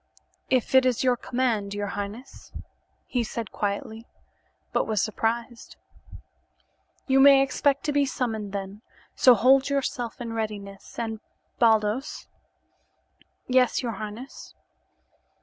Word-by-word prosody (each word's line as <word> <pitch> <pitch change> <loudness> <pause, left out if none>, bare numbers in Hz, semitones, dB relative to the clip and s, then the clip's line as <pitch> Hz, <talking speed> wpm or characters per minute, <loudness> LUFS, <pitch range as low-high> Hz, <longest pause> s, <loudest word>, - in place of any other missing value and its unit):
"If 255 -1 +1
it 260 0 +7
is 255 -2 +1
your 250 -1 +3
command, 230 -5 -1
your 205 0 -3
highness," 205 +6 -7 0.5
he 245 -2 -1
said 225 -1 -5
quietly, 215 +3 -4 0.7
but - - +1
he - - -10
was 215 -2 +1
surprised. 230 +3 -2 1.3
"You 265 -1 +3
may 275 0 +7
expect 280 +1 0
to 300 - -1
be 285 -1 +2
summoned 220 -6 -3
then, 200 +1 -6 0.3
so 250 -2 +6
hold 265 +5 +4
yourself 255 -4 -2
in 235 -2 -5
readiness. 205 -3 -6
And, 225 -2 -3 0.4
Baldos 220 +3 +1 0.6
" - - -46 0.5
"Yes, 255 0 +2
your 235 - -2
highness?" 215 +5 -8
230 Hz, 125 wpm, -25 LUFS, 210-260 Hz, 1.3 s, it